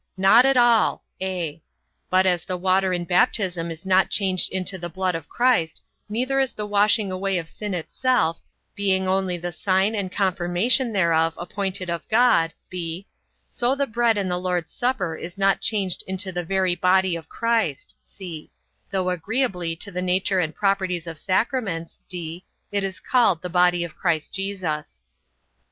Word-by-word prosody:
Not 210 +7 +6
at 270 -1 +3
all: 240 -2 +4 0.2
(a) 175 -5 -3 0.5
but 185 +1 +4
as 180 -3 +2
the 185 - -3
water 190 +1 +2
in 175 -1 -1
baptism 180 -2 +1
is 165 +2 -8
not 190 0 +3
changed 190 -3 +1
into 190 0 -1
the 175 0 -5
blood 185 +2 -1
of 165 -2 -6
Christ, 240 -11 +1 0.3
neither 255 +5 0
is 265 -2 0
the 210 - -4
washing 205 0 +3
away 190 0 -1
of 165 -2 -4
sin 205 +2 -5
itself, 175 -1 0 0.3
being 190 -2 +1
only 185 -1 0
the 175 +1 -5
sign 190 +4 +1
and 200 -4 -3
confirmation 195 +7 +1
thereof 165 -4 +2
appointed 185 +1 -4
of 170 - -5
God; 220 -8 +4 0.2
(b) 175 +1 -5 0.4
so 245 +2 0
the 280 0 0
bread 235 -2 +1
in 200 -2 -1
the 180 -1 -1
Lord's 180 -2 -2
supper 245 -10 -1
is 170 +3 -8
not 195 0 +2
changed 195 -5 0
into 190 +1 -2
the 175 -1 -3
very 185 +1 +1
body 185 0 +2
of 160 -1 -8
Christ; 230 - -1
(c) 170 -6 -9 0.4
though 185 -1 0
agreeably 180 -2 -1
to 200 +4 -6
the 180 0 -3
nature 185 +1 +1
and 160 -3 -1
properties 190 -4 0
of 165 -2 -7
sacraments, 190 -4 -1
(d) 175 0 -6 0.3
it 200 -1 0
is 190 -4 -3
called 210 -9 +2
the 180 - -3
body 175 0 +3
of 170 - -7
Christ 165 -4 -1
Jesus. 185 - -4
185 Hz, 170 wpm, -23 LUFS, 175-205 Hz, 0.5 s, Not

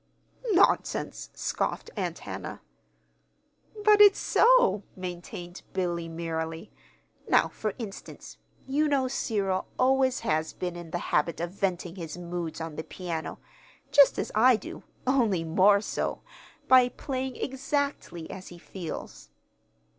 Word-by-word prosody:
"Nonsense!" 365 - +2
scoffed 465 - -2
Aunt - - -2
Hannah. - - -7 1.2
"But 420 0 +6
it's 410 -1 +8
so," - - +4
maintained 175 -1 -7
Billy, 175 -3 -2
merrily. 165 0 -4 0.6
"Now, - - +4
for 215 -2 -4
instance. 220 -4 -9 0.3
You 290 +3 +1
know 275 -3 +2
Cyril 200 -7 -1
always 260 0 +3
has 155 -7 0
been 180 -1 -4
in 175 -1 -8
the 175 - -2 0.2
habit 160 +3 +2
of 170 +1 -3
venting 185 -2 -2
his 165 -2 -6
moods 175 -2 -5
on 160 -2 -6
the 160 - -3
piano 170 -3 -5 0.5
(just 280 -2 +6
as - - -2
I 245 +4 +6
do, 215 - -7 0.2
only 235 -10 +2
more 190 +5 +4
so) - - -3 0.4
by 255 -1 +7
playing 260 -1 -4
exactly 270 - -3
as 185 0 -8
he 175 - -11
feels. 170 - -8
190 Hz, 125 wpm, -28 LUFS, 170-260 Hz, 1.2 s, it's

